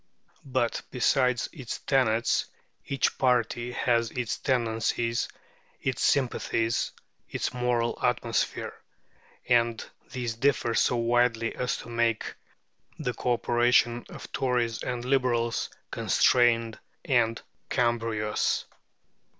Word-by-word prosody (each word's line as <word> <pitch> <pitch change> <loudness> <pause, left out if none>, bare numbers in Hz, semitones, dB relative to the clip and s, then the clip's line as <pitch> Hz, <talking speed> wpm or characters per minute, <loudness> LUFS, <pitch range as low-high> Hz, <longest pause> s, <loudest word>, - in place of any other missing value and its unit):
But, 125 -3 0
besides 125 -1 +2
its 130 -9 -5
tenets, 120 -4 +1 0.4
each 140 - 0
party 125 -1 +1
has 115 -2 +1
its 125 -1 -3
tendencies, 115 -1 0 0.5
its 130 -3 -2
sympathies, 115 -4 +1 0.4
its - - -2
moral 120 -1 0
atmosphere; 120 -2 0 0.7
and 120 -2 +2 0.3
these 125 -4 -3
differ 120 -1 +1
so 125 - +3
widely 115 -1 +1
as 125 - -1
to - - -10
make 115 -1 0 0.6
the 125 - -2
co 125 - 0
operation 120 0 +2
of - - -10
Tories 120 -3 0
and 125 -1 -3
Liberals 125 -3 +1 0.2
constrained 115 -2 +3 0.3
and 115 -4 +2 0.3
cumbrous. 115 -4 0
120 Hz, 100 wpm, -27 LUFS, 115-125 Hz, 0.7 s, so